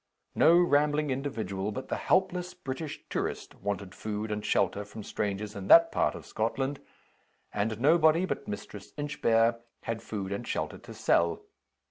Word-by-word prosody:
No 170 - +6
rambling 150 -3 +3
individual 110 -7 -3
but 130 +5 -6
the - - 0
helpless 180 -1 +1
British 150 -1 -6
Tourist - - -3
wanted 100 -1 -3
food 110 0 -4
and 105 0 -3
shelter 100 +1 +1
from 105 +1 -9
strangers 105 +1 -3
in 95 -1 -6
that 165 +7 +8
part - - +1
of - - -9
Scotland; 135 +5 -2 0.7
and 110 +2 -1
nobody 160 +5 +5
but 140 - -4
Mistress 100 0 -7
Inchbare 115 -5 +2 0.2
had 115 -1 -3
food 100 -3 -5
and 100 - -4
shelter - - -3
to - - -11
sell. 85 -1 +2
115 Hz, 150 wpm, -29 LUFS, 105-150 Hz, 0.7 s, that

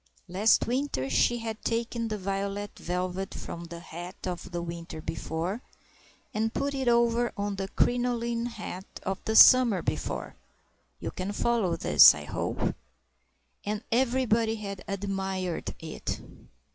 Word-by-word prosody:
Last 195 +5 +3
winter 245 - -1
she 240 - +3
had 225 -2 -5
taken 230 0 -1
the 215 -1 -3
violet 200 +1 -3
velvet 180 +2 -3
from 170 0 -6
the 170 0 -8
hat 175 +1 -8
of 180 -1 -4
the 175 -1 -3
winter 170 -1 -6
before, 165 +7 -3 0.7
and 220 +1 0
put 280 +3 -1
it 265 -2 -2
over 235 0 +3
the 200 -1 -2
crinoline 240 -1 +1
hat 215 -5 -6 0.2
of 190 0 -3
the 220 - 0
summer 245 -5 +8
before - - -3 0.6
(you - - -4
can 185 +2 -4
follow 210 -5 +1
this, - - +8
I - - -7
hope?), - - -2 0.9
and 210 +2 -3
everybody 235 -2 +2
had 200 -3 -6
admired 195 -3 -3
it. 160 -1 -5
205 Hz, 135 wpm, -28 LUFS, 185-235 Hz, 0.9 s, summer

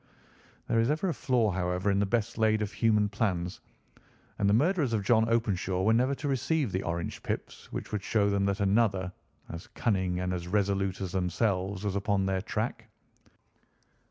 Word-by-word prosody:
There 115 - +2
is 115 +2 +2
ever 155 +6 0
a - - 0
flaw, 120 -8 +1
however, 90 +2 0
in 100 - +2
the 100 - +1
best 115 0 0
laid 110 -1 +3
of 105 - -4
human 105 -3 +3
plans, 95 -4 -2 0.8
and 100 - +3
the - - +4
murderers 150 - +2
of 105 -3 0
John 110 +2 +3
Openshaw 95 -5 0
were 110 +3 +4
never 130 +4 +2
to 145 - -5
receive 135 -1 0
the 95 - -1
orange 85 +1 -3
pips - - -5
which - - -5
would 105 -2 -2
show 100 +1 +1
them 100 -1 +1
that 100 +1 0
another, 100 -2 +2 0.4
as 85 0 -7
cunning 95 -6 -1
and 90 0 -1
as 85 -1 -4
resolute 100 -1 0
as 95 -2 -3
themselves, 95 +1 -1
was 100 -2 -1
upon 100 -1 +1
their 95 -1 0
track. - - -3
100 Hz, 185 wpm, -29 LUFS, 95-115 Hz, 0.8 s, the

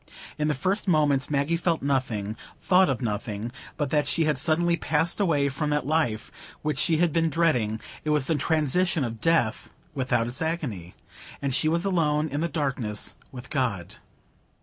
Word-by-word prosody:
In 150 - +1
the 150 - +1
first 190 +9 -1
moments 145 -6 +2
Maggie 145 +3 +1
felt 170 -3 0
nothing, 115 -7 -1 0.2
thought 185 -2 +4
of 130 -1 -1
nothing, 105 0 -3 0.3
but 145 -4 -2
that 150 -2 +2
she 165 +3 +1
had 150 -4 +1
suddenly 170 +3 +2
passed 160 +2 0
away 155 -8 +2
from 150 +2 -2
that 150 -2 0
life 140 -8 0 0.3
which 150 0 -1
she 160 - +3
had 170 -2 +2
been 165 -1 +2
dreading; 125 -10 +1 0.2
it 155 - -2
was 150 -3 +2
the 165 - +1
transition 160 +2 +1
of 115 -2 -5
death, 165 -10 +1 0.2
without 130 -4 0
its 120 +5 -3
agony,—and 140 - -5
she 155 +3 +2
was 170 +3 0
alone 155 -5 +1
in 145 +2 -2
the 170 - 0
darkness 130 -8 -2 0.2
with 125 -1 -10
God. 115 - -1
150 Hz, 170 wpm, -26 LUFS, 125-165 Hz, 0.3 s, thought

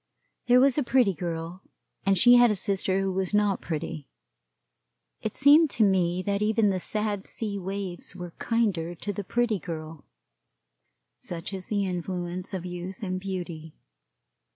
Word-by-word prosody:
There 250 +1 +6
was 275 +2 +4
a - - +1
Pretty 245 -5 +3
Girl, 170 +1 -5 0.5
and 195 -1 +4
she 245 +7 +7
had 245 -1 +7
a 210 - +1
sister 195 0 0
who 195 0 0
was 190 +1 -1
not 205 -2 +2
pretty. 155 -2 -5 1.1
It - - -4
seemed 290 +3 +6
to 225 - +5
me 185 -2 +2
that 200 0 -1
even 215 0 +3
the 185 - -1
sad 210 +1 -2
sea 205 -3 -3
waves 190 -1 -4
were 175 -2 -8
kinder 195 -8 0
to 205 +5 -4
the 205 - -4
Pretty 230 0 0
Girl, 160 -2 -7 1.2
such 170 +2 -6
is 190 -1 -5
the 205 -2 0
influence 180 0 -4
of 185 -3 -4
youth 180 +3 -7
and 185 -1 -2
beauty. 175 -5 -6
190 Hz, 155 wpm, -27 LUFS, 175-210 Hz, 1.2 s, she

